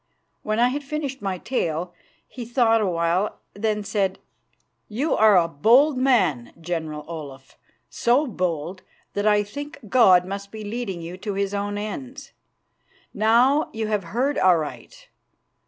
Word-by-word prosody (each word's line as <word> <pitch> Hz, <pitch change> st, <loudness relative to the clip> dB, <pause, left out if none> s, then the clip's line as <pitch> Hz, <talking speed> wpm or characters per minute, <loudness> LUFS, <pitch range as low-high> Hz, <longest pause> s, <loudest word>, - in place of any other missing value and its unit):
When 215 Hz, 0 st, -2 dB
I 245 Hz, +1 st, +4 dB
had 285 Hz, +3 st, -4 dB
finished 280 Hz, -2 st, -4 dB
my 195 Hz, -2 st, -2 dB
tale 175 Hz, -6 st, -2 dB, 0.3 s
he 250 Hz, -, -8 dB
thought 230 Hz, -1 st, +2 dB
a 205 Hz, -, +1 dB
while. 170 Hz, +3 st, 0 dB, 0.2 s
Then 215 Hz, +1 st, -1 dB
he 210 Hz, -, -5 dB
said, 195 Hz, -2 st, -1 dB, 0.7 s
"You 265 Hz, +9 st, -1 dB
are 215 Hz, -3 st, +6 dB
a 170 Hz, -2 st, +3 dB
bold 240 Hz, -, +4 dB
man, 200 Hz, -, +1 dB
General 160 Hz, -3 st, -4 dB
Olaf; 140 Hz, -5 st, -9 dB, 0.3 s
so 250 Hz, +6 st, +2 dB
bold 180 Hz, -, -3 dB, 0.3 s
that 205 Hz, +1 st, 0 dB
I 210 Hz, -1 st, +4 dB
think 285 Hz, +8 st, -8 dB
God 185 Hz, -8 st, +5 dB
must 200 Hz, +1 st, -6 dB
be 220 Hz, -1 st, -8 dB
leading 205 Hz, -5 st, -4 dB
you 175 Hz, +2 st, -7 dB
to 205 Hz, +1 st, -5 dB
His 200 Hz, 0 st, -1 dB
own 205 Hz, 0 st, -2 dB
ends. 255 Hz, +7 st, -7 dB, 0.8 s
Now, 240 Hz, +8 st, +3 dB
you 220 Hz, -1 st, -3 dB
have 210 Hz, -4 st, -1 dB
heard 255 Hz, +11 st, -1 dB
aright. 185 Hz, -, 0 dB
205 Hz, 150 wpm, -23 LUFS, 180-245 Hz, 0.8 s, are